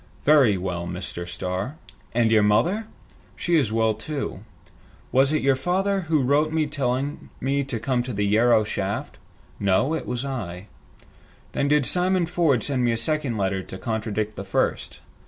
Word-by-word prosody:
"Very 140 -9 +5
well, 90 -2 -3
Mr. 90 -1 -5
Starr." 90 - -3 0.4
"And 115 -1 +2
your 110 -1 +5
mother?" 175 - +2 0.5
"She 175 - 0
is 135 -9 +2
well, 110 0 +2
too." 135 0 -5 0.7
"Was 135 +2 +4
it 155 - 0
your 135 -1 +4
father 190 +7 0
who 155 -4 +3
wrote 145 +4 +2 0.2
telling 140 +1 -2
me 140 +1 0
to 130 -4 -4
come 125 +1 0
to 125 +1 -5
the 105 -2 -1
Yarrow 110 +2 +4
shaft?" 100 -1 -3 0.4
"No, 100 +10 +2
it 160 - -3
was 125 +2 -3
I." 100 -9 -5 0.9
"Then 140 - 0
did 145 -1 +3
Simon 180 +2 +2
Ford 165 -8 +1
send 135 -3 0
me 120 - +3
a - - -1
second 135 0 -1
letter 95 -1 0
to 95 - -9
contradict 110 -1 -2
the 100 - -4
first?" 95 - -1
125 Hz, 165 wpm, -24 LUFS, 105-145 Hz, 0.9 s, Very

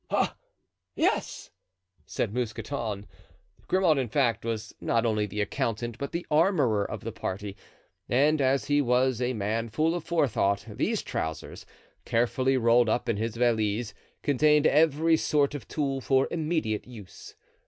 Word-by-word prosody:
"Ah, - - 0 0.6
yes!" - - -1 0.6
said 105 - -2
Mousqueton. 110 -3 -3 0.6
Grimaud, 180 -6 +3
in 130 - -1
fact, 120 -3 +1
was 110 -2 -4
not 115 0 +1
only 105 -2 +1
the 105 +1 -3
accountant, 115 +3 -2
but 140 - -4
the 170 +1 -4
armorer 150 - +3
of 105 0 -6
the 115 - -4
party; 100 -2 -5 0.5
and 145 +4 +3
as 135 +1 +2
he 145 +1 +2
was 125 -1 +1
a 125 +1 0
man 110 +2 -2
full 155 +9 +1
of 175 -2 -3
forethought, 120 -12 +1
these 140 - -2
trousers, 80 0 -5 0.4
carefully 130 +3 +1
rolled 120 -1 +4
up 120 +2 0
in 115 -3 0
his 110 +1 -3
valise, 115 -2 0 0.3
contained 150 +2 +3
every 160 +2 +4
sort 145 -2 +1
of 145 - -7
tool 135 -3 -2
for 135 +1 +2
immediate 155 -11 -1
use. 110 -7 -12
120 Hz, 145 wpm, -27 LUFS, 110-145 Hz, 0.6 s, rolled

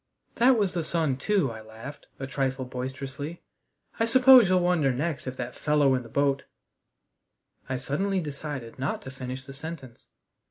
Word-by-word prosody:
"That 250 +1 +5
was 200 -4 +1
the 170 -2 -1
sun 155 -5 0
too," 190 - +1
I 110 -1 -8
laughed, 110 +6 -10
a 135 - -3
trifle 135 -1 -2
boisterously. 135 +5 -6 0.6
"I 225 - +3
suppose 250 -2 +7
you'll 185 -1 +4
wonder 175 -6 +2
next 140 +2 -2
if 130 0 -5
that 125 0 -4
fellow 150 -2 +2
in 130 - +1
the 115 - -12
boat 140 +2 +1 0.6
" - - -35
I 130 - -1
suddenly 190 +10 -1
decided 140 -6 -6
not 140 +4 -2
to 130 - -7
finish 130 0 -6
the 135 - -9
sentence. 135 -4 -9
140 Hz, 170 wpm, -27 LUFS, 130-170 Hz, 0.6 s, suppose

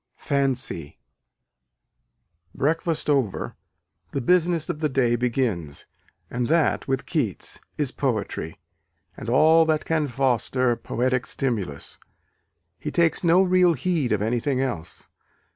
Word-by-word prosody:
Fancy. 130 - -1 1.6
Breakfast 160 +2 0
over, 135 -9 0 0.6
the 140 - 0
business 170 +3 +2
of 150 - -3
the 155 -1 0
day 125 -3 +2
begins: 115 - -1 0.4
and 120 0 -2
that, 160 0 +2
with 135 -1 -1
Keats, - - -2 0.2
is 145 -4 -1
poetry, 105 - -2 0.6
and 110 - -7
all 160 +6 +6
that 155 -1 0
can 155 -2 +1
foster 125 -1 +1
poetic 125 +2 -1
stimulus. 105 - -3 0.8
He 150 - -4
takes 170 +2 +2
no 175 +2 +5
real 180 -2 +4
heed 155 -3 -1
of 105 -1 +1
anything 125 +4 0
else. 125 -12 -4
135 Hz, 115 wpm, -24 LUFS, 120-155 Hz, 1.6 s, all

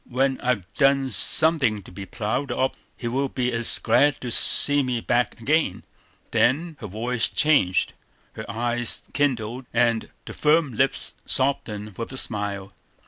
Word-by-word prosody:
When 135 +1 -1
I've 120 -7 -1
done 135 +1 +2
something 125 - +3
to - - -14
be 95 +2 -9
proud 125 +5 -3
of, 130 +2 -1 0.2
he 120 - -5
will 135 +3 -1
be 125 -1 -2
as 115 -1 +3
glad 130 +5 +2
to 125 - -5
see 145 +4 +6
me 125 -3 -2
back 120 +1 -1
again." 145 - 0 0.5
Then 155 +7 +1
her 105 - -7
voice 115 +4 -2
changed, 140 -13 +1 0.4
her 110 - -9
eyes 120 0 -1
kindled, 125 -3 -2
and 115 -1 0 0.2
the - - -8
firm 150 -3 +1
lips 135 +4 -1
softened 105 -7 -1
with 115 - -5
a 130 - -8
smile. 100 -5 -4
120 Hz, 150 wpm, -23 LUFS, 110-135 Hz, 0.5 s, see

